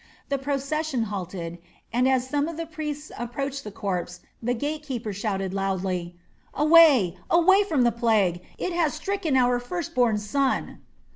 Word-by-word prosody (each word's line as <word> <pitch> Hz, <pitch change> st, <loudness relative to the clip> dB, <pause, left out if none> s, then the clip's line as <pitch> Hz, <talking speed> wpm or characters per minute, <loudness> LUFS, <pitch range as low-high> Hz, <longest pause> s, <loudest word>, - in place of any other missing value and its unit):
The 280 Hz, -1 st, 0 dB
procession 280 Hz, -1 st, -1 dB
halted, 180 Hz, -4 st, -5 dB, 0.3 s
and 250 Hz, +2 st, +3 dB
as 260 Hz, -1 st, +1 dB
some 290 Hz, +2 st, 0 dB
of 330 Hz, -1 st, -6 dB
the 330 Hz, -, -3 dB
priests 300 Hz, -2 st, -6 dB
approached 275 Hz, +3 st, -4 dB
the -, -, -6 dB
corpse 180 Hz, -3 st, -4 dB, 0.2 s
the 245 Hz, +2 st, 0 dB
gate 295 Hz, +5 st, -3 dB
keeper 240 Hz, -8 st, -4 dB
shouted 195 Hz, -2 st, -2 dB
loudly: 185 Hz, -3 st, -2 dB, 0.4 s
"Away, 295 Hz, -, +6 dB
away 380 Hz, +4 st, +5 dB
from 305 Hz, -9 st, +2 dB
the 240 Hz, -, +4 dB
plague! 215 Hz, -7 st, +1 dB, 0.2 s
It 365 Hz, -, -2 dB
has 335 Hz, -3 st, +1 dB
stricken 325 Hz, -3 st, -1 dB
our 245 Hz, -1 st, +3 dB
first 325 Hz, +7 st, -5 dB
born 240 Hz, -4 st, +3 dB
son." 260 Hz, +6 st, -1 dB
255 Hz, 155 wpm, -25 LUFS, 205-300 Hz, 0.4 s, Away